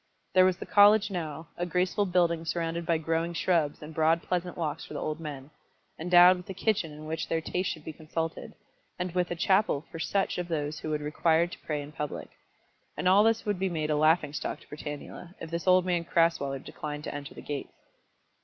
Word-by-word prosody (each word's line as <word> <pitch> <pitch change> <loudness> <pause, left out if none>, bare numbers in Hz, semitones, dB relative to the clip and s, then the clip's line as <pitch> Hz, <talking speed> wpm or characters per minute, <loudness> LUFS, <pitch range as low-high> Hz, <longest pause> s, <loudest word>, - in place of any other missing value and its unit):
There 185 0 +7
was 185 -1 +2
the - - -7
college 205 +1 +6
now, 160 -3 -5
a 175 - -1
graceful 180 +3 +1
building 170 -2 +2
surrounded 165 0 -2
by 165 - +3
growing 165 +2 -1
shrubs 160 -4 +1
and 155 +1 -9
broad 160 +1 +2
pleasant 180 -1 -2
walks 155 -4 -2
for - - -9
the - - -2
old 155 +1 -3
men, 145 -3 -7 0.5
endowed 180 +2 +7
with 180 - -11
a 190 - -5
kitchen 195 -5 0
in 150 +1 -10
which 160 +1 -3
their 165 - +1
taste 180 +4 -2
should 155 -3 -6
be 160 - -6
consulted, 160 +1 -5 0.4
and 180 0 -3
with 180 -1 0
a 175 - -2
chapel 190 -4 +2
for 165 - -7
such 195 +2 0
of 175 - -3
those 150 -2 -2
who - - -5
would 150 -1 -1
require 160 +2 +2
to 175 - -9
pray 150 -2 -1
in 145 - -10
public; 150 -1 -5 0.7
and - - 0
all 195 +3 +6
this 225 +1 +2
would 205 -3 -1
be 190 0 0
made 155 -3 -2
a - - +2
laughing 155 -1 +3
stock - - -3
to - - -19
Britannula, 150 +4 -8
if 165 - -8
this 170 +2 -3
old 185 0 +5
man 175 -2 +1
Crasweller 165 -5 +1
declined 150 +2 -7
to - - -5
enter 145 -1 -7
the - - -9
gates. 145 -1 -5
165 Hz, 220 wpm, -29 LUFS, 155-180 Hz, 0.7 s, There